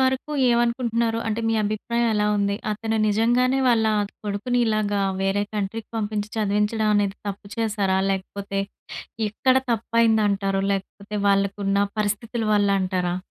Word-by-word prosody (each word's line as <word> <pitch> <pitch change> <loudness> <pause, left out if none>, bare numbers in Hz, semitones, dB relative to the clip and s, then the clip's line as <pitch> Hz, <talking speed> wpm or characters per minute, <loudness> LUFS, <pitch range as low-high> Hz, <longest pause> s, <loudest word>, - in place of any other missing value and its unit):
వరకు 260 +3 0 0.2
ఏమనుకుంటున్నారు? 235 -1 +1
అంటే 220 +1 -1
మీ 225 - +1
అభిప్రాయం 235 +3 -1
ఎలా 210 0 +2
ఉంది? 200 0 0 0.2
అతను 220 +1 -2
నిజంగానే 240 +5 +2
వాళ్ళ 230 -2 +3 0.4
కొడుకుని 210 +5 -1
ఇలాగా 210 -2 0 0.2
వేరే 195 +1 +1
కంట్రీకి 210 +2 -3
పంపించి 210 -1 -2
చదివించడం 210 +1 +1
అనేది 205 -1 +1
తప్పు 200 0 -7
చేశారా? 205 -4 0
లేకపోతే 195 +1 -3 0.7
ఎక్కడ 255 +5 +2
తప్పయిందంటారు? 215 -4 +2
లేకపోతే 200 +1 -5
వాళ్ళకున్న 200 0 +1 0.2
పరిస్థితుల 215 +3 -1
వల్ల 205 -1 +3
అంటారా? 180 -1 -1
210 Hz, 120 wpm, -23 LUFS, 200-230 Hz, 0.7 s, వాళ్ళ